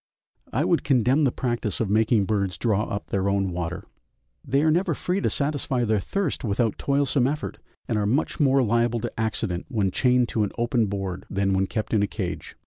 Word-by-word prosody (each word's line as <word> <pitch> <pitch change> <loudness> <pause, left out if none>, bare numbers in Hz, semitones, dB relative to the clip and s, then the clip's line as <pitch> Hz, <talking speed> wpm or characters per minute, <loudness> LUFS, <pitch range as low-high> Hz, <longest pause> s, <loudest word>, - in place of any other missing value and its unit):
I - - +1
would - - +2
condemn 135 +2 +3
the 130 - +2
practice 120 -6 -2
of 115 - 0
making 110 0 +3
birds 100 -3 -1
draw 110 -2 +1
up 100 - -5
their 100 0 +1
own 100 -1 0
water; 85 0 -4 0.6
they 140 +3 +1
are 160 - +4
never 175 +5 +1
free 185 +2 -1
to - - +1
satisfy 140 -3 -1
their 110 -1 +2
thirst 190 - -2
without 110 0 0
toilsome 140 -2 +2
effort, 150 +2 -4 0.3
and 115 -5 0
are 105 - 0
much 135 +9 0
more 135 -2 +4
liable 115 +1 +1
to - - -5
accident 110 -5 -2
when 100 -4 0
chained 125 +3 +3
to 110 - 0
an 105 - -1
open 120 -1 +1
board 95 -2 -4
than 95 0 0
when 95 0 +1
kept 110 +2 -3
in 105 - +3
a 100 - +2
cage. - - -5
115 Hz, 205 wpm, -25 LUFS, 100-130 Hz, 0.6 s, are